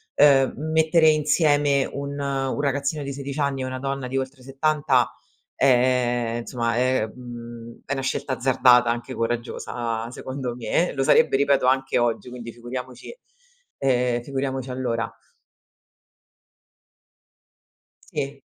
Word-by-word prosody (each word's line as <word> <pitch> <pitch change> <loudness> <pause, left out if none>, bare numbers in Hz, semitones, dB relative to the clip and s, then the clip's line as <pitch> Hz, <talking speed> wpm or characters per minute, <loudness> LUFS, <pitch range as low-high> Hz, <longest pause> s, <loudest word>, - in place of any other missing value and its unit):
uhm, 135 -2 +5 0.2
mettere 160 0 +4
insieme 145 -2 +3
un 140 0 -5
un 135 0 -1
ragazzino 140 +1 -1
di 140 - -4
16 140 +1 -6
anni 140 -2 0
e - - -2
una 130 0 -4
donna 135 -1 -3
di 130 +1 -3
oltre 130 0 -4
70, 135 -2 +1 0.4
ehm, 120 -2 +2
insomma 115 -1 -2
è 130 -2 +2
mhmm, 120 -1 -10
è 140 - -2
una 135 - -2
scelta 130 0 -2
azzardata 125 -1 +4
anche 120 +2 -3
coraggiosa, 115 -1 -3
secondo 130 -2 -5
me, 125 +9 0
lo 135 - 0
sarebbe, 135 - +4
ripeto, 140 -1 +3
anche 135 +1 +2
oggi 120 0 0
quindi 120 -1 -8
figuriamoci 125 - -7 0.7
ehm, 125 -2 +1
figuriamoci 135 0 -3
allora. 120 -3 -2 2.9
Sì. 140 0 -5
130 Hz, 125 wpm, -24 LUFS, 120-140 Hz, 2.9 s, uhm